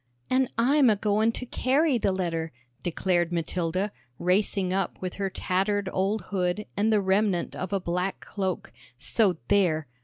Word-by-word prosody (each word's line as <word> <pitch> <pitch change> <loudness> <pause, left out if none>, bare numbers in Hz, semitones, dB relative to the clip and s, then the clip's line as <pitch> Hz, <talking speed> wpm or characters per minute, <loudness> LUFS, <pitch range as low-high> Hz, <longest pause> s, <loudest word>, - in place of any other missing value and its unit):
"An' 260 0 +3
I'm 265 +3 +5
a 215 - +4
goin' 215 +2 +2
to 250 - -4
carry 265 +2 +2
th' - - -2
letter," 165 -4 -2 0.3
declared 175 0 0
Matilda, 175 +3 -1 0.3
racing 185 0 +1
up 190 -2 -1
with 185 -1 -5
her 195 -1 -1
tattered 195 +2 0
old 195 +3 0
hood 185 +1 0
and 210 +3 +2
the 215 - +4
remnant 190 -1 +1
of 185 +1 -4
a 200 - +1
black 180 +2 -2
cloak, 190 - -4 0.2
"so 190 - +2
there!" 165 -6 +2
195 Hz, 155 wpm, -27 LUFS, 180-210 Hz, 0.3 s, I'm